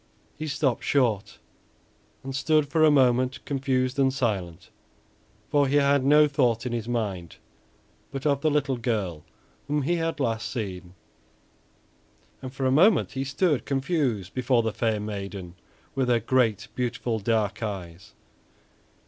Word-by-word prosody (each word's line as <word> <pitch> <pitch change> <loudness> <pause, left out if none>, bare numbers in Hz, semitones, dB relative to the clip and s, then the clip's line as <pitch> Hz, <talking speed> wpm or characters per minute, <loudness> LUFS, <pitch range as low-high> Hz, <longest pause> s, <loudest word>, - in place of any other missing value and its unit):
He 155 - -5
stopped 140 -4 0
short 120 -8 0 0.9
and 135 0 -5
stood 150 +2 +2
for 160 +2 +2
a 155 - +7
moment 130 -2 +3
confused 130 -1 -1
and 135 -1 +4
silent; 100 -10 -3 0.8
for 145 -1 +2
he 140 - 0
had 140 -1 +3
no 150 +2 +6
thought 125 -5 +1
in 125 - -2
his 115 -2 -3
mind 100 -8 -3 0.7
but 135 0 -6
of 140 -2 +2
the 155 - +2
little 140 -3 0
girl 105 -10 -2 0.4
whom 150 0 0
he 170 +5 +1
had 165 -2 -2
last 115 -4 -1
seen, 95 -6 -6 1.5
and 130 -1 -7
for 135 0 -4
a 130 - +3
moment 180 +6 +4
he 135 -1 -3
stood 145 +2 0
confused 135 - -1
before 125 -2 +1
the 110 -1 -2
fair 110 -1 0
maiden 100 -4 -6 0.4
with 135 -2 0
her 120 -1 +3
great, 115 -3 +1
beautiful 120 -2 -2
dark 110 -1 0
eyes. 95 -5 -6
130 Hz, 145 wpm, -26 LUFS, 110-140 Hz, 1.5 s, a